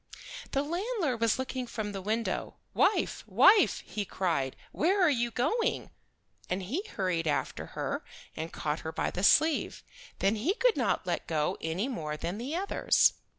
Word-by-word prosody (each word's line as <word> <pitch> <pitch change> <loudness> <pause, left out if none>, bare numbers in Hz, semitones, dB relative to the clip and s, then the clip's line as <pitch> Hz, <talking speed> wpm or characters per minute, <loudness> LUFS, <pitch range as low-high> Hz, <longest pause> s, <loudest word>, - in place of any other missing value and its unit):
The 275 - +2
landlord 340 - -2
was 230 -1 +3
looking 260 -1 -3
from 215 -3 -4
the 195 -1 -5
window. 220 +4 -2 0.2
"Wife, 425 - +2
wife," 405 +1 +5
he 210 - -3
cried, 165 -9 -1 0.2
"where 375 +6 +2
are 350 -5 +5
you 240 -3 +1
going?" 295 - 0 0.6
And 185 +1 -1
he 260 - -2
hurried 180 -4 0
after 145 - -1
her - - -2 0.3
and 160 +1 -5
caught 150 +1 -2
her 160 - -5
by - - -1
the 180 - -4
sleeve. 310 +9 +3 0.3
Then 200 +3 +1
he 310 - 0
could - - +3
not - - 0
let - - -2
go 155 -2 0
any 165 +8 -1
more 155 - -4
than 175 +7 -4
the 270 +7 -3
others. 390 +3 +3
230 Hz, 165 wpm, -30 LUFS, -, 0.6 s, wife